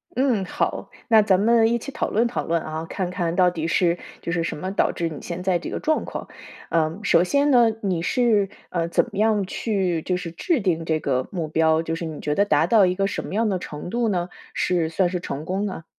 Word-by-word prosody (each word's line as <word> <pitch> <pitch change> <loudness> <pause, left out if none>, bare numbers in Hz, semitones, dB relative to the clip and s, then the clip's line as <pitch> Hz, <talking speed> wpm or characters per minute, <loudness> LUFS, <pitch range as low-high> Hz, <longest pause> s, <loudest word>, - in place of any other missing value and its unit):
嗯， 245 -7 +1
好， - - -2 0.2
那 220 -1 +7
咱 195 -2 +3
们 225 +1 +4
一 235 - +2
起 275 +4 -7
讨 - - -2
论 230 +3 +2
讨 240 - -3
论 165 0 0
啊， 155 +1 -5
看 180 +1 -3
看 175 -2 -2
到 180 -1 +5
底 165 -2 -3
是 175 -1 +2 0.2
就 170 - -4
是 170 -1 0
什 165 - -3
么 185 +4 -4
导 - - +1
致 170 -1 -2
你 150 - -8
现 180 +1 -5
在 185 -2 +1
这 - - -6
个 - - -3
状 310 0 0
况。 - - -6 0.4
呃， 165 +3 0
首 175 -3 +4
先 285 +8 +2
呢， 240 -3 +6
你 180 -4 0
是， 210 -1 +2 0.2
呃， 170 -2 -1
怎 170 - +2
么 200 - -7
样 215 -3 +2
去 185 -6 -1
就 180 +1 -1
是 170 -2 -6
制 295 - 0
定 165 -4 0
这 160 -1 0
个 130 -3 -1
目 170 -5 -3
标， 160 +1 +2
就 165 - -3
是 165 0 -4
你 155 -2 -6
觉 150 - -1
得 200 +6 +3
达 155 -3 +3
到 205 0 +5
一 180 0 +1
个 195 0 +1
什 - - -2
么 195 - -5
样 225 0 +2
的 185 -2 -1
程 150 +1 -7
度 235 +1 0
呢， 175 -2 -1 0.2
是 170 -3 0
算 180 +2 +1
是 180 -1 -2
成 150 -1 -5
功 195 +4 -1
呢？ 185 -4 -5
180 Hz, 265 characters per minute, -23 LUFS, 165-210 Hz, 0.4 s, 那